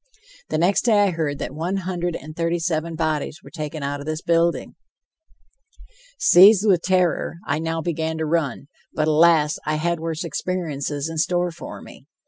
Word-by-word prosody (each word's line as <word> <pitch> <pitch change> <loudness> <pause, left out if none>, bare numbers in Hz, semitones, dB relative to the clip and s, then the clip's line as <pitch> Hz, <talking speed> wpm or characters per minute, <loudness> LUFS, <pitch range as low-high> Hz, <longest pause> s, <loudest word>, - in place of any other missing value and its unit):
The - - -1
next 180 +7 +2
day 225 -3 +4
I 200 - +2
heard 155 -4 -2
that - - -5
one 170 +6 -2
hundred 175 -2 -2
and 155 +2 -9
thirty 170 +1 0
seven 165 -1 -2
bodies 155 +1 -2
were - - -13
taken 155 -2 -5
out 140 +1 -3
of 140 - -9
this 155 +1 -3
building. 170 0 +1 1.4
Seized 200 - +7
with 185 -5 +4
terror, 180 -3 +1
I 145 +2 -1
now 165 0 -2
began 160 -1 -2
to 160 - -2
run, 150 -5 -1 0.3
but, 155 0 +1
alas, 155 -1 +4
I 155 - -1
had 170 +2 -1
worse 165 0 -3
experiences 155 -5 -3
in 165 -1 -4
store 175 +2 +1
for 170 - -9
me. - - -14
165 Hz, 175 wpm, -22 LUFS, 155-175 Hz, 1.4 s, Seized